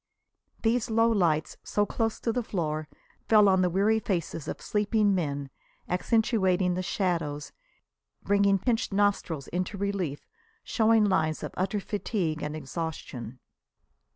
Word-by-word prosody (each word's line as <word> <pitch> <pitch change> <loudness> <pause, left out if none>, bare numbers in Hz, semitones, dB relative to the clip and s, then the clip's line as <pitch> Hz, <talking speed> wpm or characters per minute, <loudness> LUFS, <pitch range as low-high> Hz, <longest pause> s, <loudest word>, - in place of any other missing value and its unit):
These 235 +1 +1
low 225 +1 +3
lights, 165 -7 +1
so 205 - +1
close 225 +1 -1
to 230 - 0
the 245 - 0
floor, 155 -8 -2 0.4
fell 210 -2 +6
on 190 -1 +4
the 180 - +3
weary 205 +5 +2
faces 170 -7 -3
of - - -4
sleeping 210 0 +1
men, 145 -6 -2 0.4
accentuating 190 -2 +2
the 180 - -1
shadows, 170 -6 -2 0.7
bringing 200 -1 +3
pinched 225 +3 0
nostrils 195 -7 0
into 185 +3 -3
relief, 195 -7 -2 0.4
showing 220 -1 +3
lines 160 -6 +1
of - - -5
utter 195 +3 -1
fatigue 190 -6 -2
and 150 +1 -3
exhaustion. 140 -6 -6
190 Hz, 130 wpm, -28 LUFS, 160-215 Hz, 0.7 s, fell